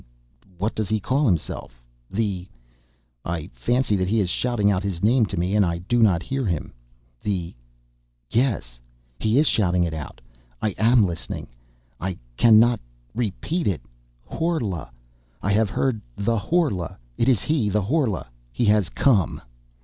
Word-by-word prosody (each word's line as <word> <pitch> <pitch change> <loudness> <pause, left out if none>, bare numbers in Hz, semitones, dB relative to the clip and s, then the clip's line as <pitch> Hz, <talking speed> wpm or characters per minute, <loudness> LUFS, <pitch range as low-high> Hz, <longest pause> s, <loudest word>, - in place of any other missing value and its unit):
what 105 +5 -1
does 110 -3 -2
he 110 - +1
call 135 +7 +1
himself... 80 - -2 0.3
the... 95 -4 -2 0.8
I 85 +1 -4
fancy 120 -3 +1
that 95 -1 0
he 110 +3 +2
is 90 -4 +1
shouting 115 -5 +1
out 95 -2 +1
his 100 -3 -3
name 115 +1 +4
to 95 - -5
me 90 +4 0
and 105 - +5
I 85 -2 0
do 100 +8 0
not 90 -7 +4
hear 135 +8 -2
him... 90 -8 -2 0.5
the... 90 -4 -2 0.7
yes... 110 - 0 0.4
he 110 +3 +2
is 150 - +5
shouting 90 - +2
it 85 -2 -1
out... 75 -3 -7 0.4
I 110 - 0
am 115 0 +5
listening... 80 -10 -5 0.5
I 95 -1 -3 0.2
cannot... 115 - +6 0.3
repeat... 125 - -2
it... 95 -6 0 0.4
Horla... 120 - -2 0.5
I 100 - -1
have 105 +1 +3
heard... 110 +1 0 0.2
the 115 +2 +1
Horla... 130 - 0 0.2
it 120 - +2
is 120 -7 +3
he... 145 -9 +1
the 105 +1 +1
Horla... 120 - 0 0.3
he 120 - 0
has 105 -3 +3
come!... 110 - +2
105 Hz, 155 wpm, -24 LUFS, 90-120 Hz, 0.8 s, cannot